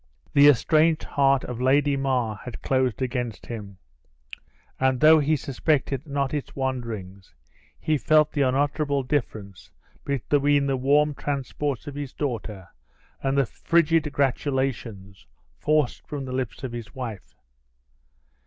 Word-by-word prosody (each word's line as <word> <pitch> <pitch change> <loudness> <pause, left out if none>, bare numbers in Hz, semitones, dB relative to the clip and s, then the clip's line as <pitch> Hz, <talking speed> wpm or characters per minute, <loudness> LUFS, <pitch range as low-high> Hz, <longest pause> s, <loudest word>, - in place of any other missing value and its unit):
The 145 0 +7
estranged 155 +4 +4
heart 135 -1 +2
of 125 -1 -6
Lady 140 +2 +3
Mar 130 -6 -1
had 125 -3 -9
closed 130 -2 0
against 125 -4 -3
him; 100 -5 -8 1.0
and 130 -1 +2
though 155 +2 +7
he 150 +2 +2
suspected 140 +1 -1
not 140 -1 -1
its 145 -2 -4
wanderings, 110 - -5 0.4
he 155 -2 0
felt 155 0 +3
the 145 - -1
unutterable 140 +1 +1
difference 110 -8 -4 0.3
between 140 +1 +1
the 135 -1 0
warm 145 +3 +2
transports 140 -1 -3
of 145 - -6
his 140 -2 -6
daughter 110 - -4 0.5
and 135 0 0
the 140 - +4
frigid 165 +3 +1
gratulations 130 -8 -2 0.3
forced 150 -4 0
from 140 -2 -5
the 130 - -6
lips 130 0 -4
of 130 - -4
his 120 -2 -8
wife. 115 -7 -7
135 Hz, 130 wpm, -25 LUFS, 125-145 Hz, 1.0 s, The